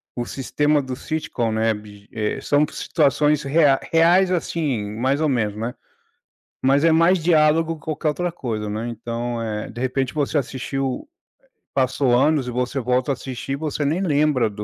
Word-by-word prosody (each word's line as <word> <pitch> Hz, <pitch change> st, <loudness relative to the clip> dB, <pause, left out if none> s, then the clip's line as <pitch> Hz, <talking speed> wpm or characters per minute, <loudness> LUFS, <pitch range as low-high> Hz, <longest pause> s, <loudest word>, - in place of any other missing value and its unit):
o 120 Hz, -1 st, -3 dB
sistema 145 Hz, +2 st, 0 dB
do 130 Hz, -1 st, -5 dB
sitcom, 130 Hz, -7 st, -3 dB
né, 110 Hz, 0 st, +2 dB
biji 105 Hz, -1 st, -12 dB
eh, 105 Hz, -1 st, -2 dB
são 145 Hz, +1 st, +2 dB
situações 150 Hz, 0 st, +1 dB
reai 140 Hz, -1 st, +4 dB
reais, 175 Hz, +3 st, +4 dB
assim, 145 Hz, -, -1 dB
mais 135 Hz, +5 st, +1 dB
ou 155 Hz, -, +2 dB
menos, 105 Hz, -5 st, 0 dB
né, 115 Hz, +3 st, -4 dB, 0.9 s
mas 140 Hz, +3 st, +3 dB
é 165 Hz, -, +5 dB
mais 170 Hz, +1 st, +4 dB
diálogo 165 Hz, 0 st, +3 dB
que 150 Hz, -, -17 dB
qualquer 155 Hz, 0 st, -1 dB
outra 175 Hz, +3 st, -2 dB
coisa, 110 Hz, -9 st, -4 dB
né. 110 Hz, +3 st, -3 dB
Então, 115 Hz, +1 st, -4 dB
eh, 105 Hz, -1 st, -4 dB
de 115 Hz, -, -9 dB
repente, 130 Hz, +1 st, -1 dB
você 150 Hz, 0 st, 0 dB
assistiu, 135 Hz, 0 st, -3 dB
eh, 340 Hz, -, -64 dB, 0.5 s
passou 130 Hz, -1 st, +2 dB
anos, 145 Hz, -1 st, +2 dB
e -, -, -3 dB
você 125 Hz, +2 st, -2 dB
volta 125 Hz, +2 st, 0 dB
a -, -, +2 dB
assistir 130 Hz, +1 st, -5 dB
e -, -, 0 dB
você 150 Hz, 0 st, -3 dB
nem 165 Hz, +7 st, 0 dB
lembra 145 Hz, -, +2 dB
135 Hz, 175 wpm, -22 LUFS, 120-155 Hz, 0.9 s, é